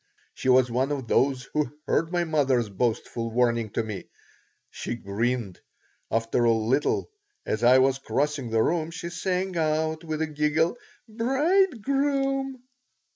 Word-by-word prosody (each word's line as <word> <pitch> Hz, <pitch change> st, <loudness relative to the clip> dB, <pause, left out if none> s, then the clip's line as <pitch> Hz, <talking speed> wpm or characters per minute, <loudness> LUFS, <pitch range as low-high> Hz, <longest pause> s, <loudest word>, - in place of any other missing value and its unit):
She 130 Hz, -, -2 dB
was 125 Hz, -1 st, +5 dB
one 130 Hz, +4 st, 0 dB
of 135 Hz, -4 st, -3 dB
those 130 Hz, +1 st, +2 dB
who 150 Hz, -1 st, -1 dB
heard 165 Hz, +1 st, 0 dB
my 175 Hz, -1 st, +1 dB
mother's 135 Hz, -8 st, +1 dB
boastful 115 Hz, +2 st, -2 dB
warning 115 Hz, -1 st, +1 dB
to 115 Hz, -, 0 dB
me. 105 Hz, -3 st, -7 dB, 0.6 s
She -, -, -4 dB
grinned. 115 Hz, -1 st, -2 dB, 0.5 s
After 115 Hz, +1 st, +1 dB
a 115 Hz, -, +5 dB
little, 115 Hz, -, 0 dB, 0.3 s
as 110 Hz, +2 st, -2 dB
I 125 Hz, +2 st, +7 dB
was 135 Hz, +1 st, +3 dB
crossing 140 Hz, -2 st, -1 dB
the 110 Hz, 0 st, +2 dB
room, 165 Hz, -1 st, 0 dB
she 170 Hz, 0 st, -6 dB
sang 185 Hz, +1 st, -2 dB
out 160 Hz, 0 st, 0 dB
with 160 Hz, -1 st, -2 dB
a -, -, +1 dB
giggle: 155 Hz, +4 st, +1 dB, 0.3 s
"Bridegroom!" 270 Hz, -, +1 dB
145 Hz, 140 wpm, -26 LUFS, 120-175 Hz, 0.6 s, I